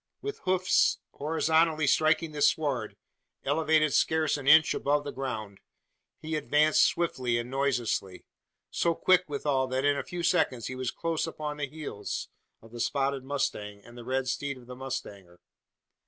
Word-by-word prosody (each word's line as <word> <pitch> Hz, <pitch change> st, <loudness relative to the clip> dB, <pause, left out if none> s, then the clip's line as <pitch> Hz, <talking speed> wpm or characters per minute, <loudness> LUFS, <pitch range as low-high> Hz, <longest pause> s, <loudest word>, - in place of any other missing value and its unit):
With 420 Hz, 0 st, -5 dB
hoofs 185 Hz, -1 st, +3 dB
horizontally 160 Hz, +1 st, +1 dB
striking 155 Hz, +3 st, +2 dB
the 150 Hz, -1 st, -6 dB
sward 140 Hz, -9 st, +1 dB, 0.5 s
elevated 155 Hz, -2 st, +2 dB
scarce 160 Hz, -1 st, +2 dB
an 140 Hz, -2 st, -6 dB
inch 155 Hz, +1 st, +7 dB
above 145 Hz, +1 st, 0 dB
the 145 Hz, -, -5 dB
ground 110 Hz, -7 st, -5 dB, 0.6 s
he 155 Hz, 0 st, -4 dB
advanced 150 Hz, +1 st, +3 dB
swiftly 145 Hz, -10 st, +1 dB
and 120 Hz, +1 st, -4 dB
noiselessly; 120 Hz, -8 st, -1 dB, 0.5 s
so 170 Hz, -1 st, +1 dB
quick 185 Hz, +1 st, +3 dB
withal, 140 Hz, -2 st, 0 dB
that 130 Hz, +2 st, -1 dB
in 145 Hz, 0 st, +3 dB
a -, -, -2 dB
few 175 Hz, -2 st, -6 dB
seconds 160 Hz, -10 st, +1 dB
he 130 Hz, -, -5 dB
was 130 Hz, -1 st, -2 dB
close 165 Hz, -1 st, -2 dB
upon 150 Hz, -2 st, -5 dB
the 145 Hz, -1 st, -2 dB
heels 150 Hz, -9 st, -6 dB, 0.3 s
of 115 Hz, -, -15 dB
the 120 Hz, -, -9 dB
spotted 135 Hz, +3 st, 0 dB
mustang, 105 Hz, -7 st, -3 dB
and 120 Hz, -, -14 dB
the 120 Hz, -, -9 dB
red 130 Hz, +1 st, -1 dB
steed 140 Hz, +1 st, -2 dB
of 125 Hz, -, -15 dB
the 125 Hz, +1 st, -9 dB
mustanger! 105 Hz, -9 st, -7 dB
140 Hz, 160 wpm, -28 LUFS, 125-155 Hz, 0.6 s, inch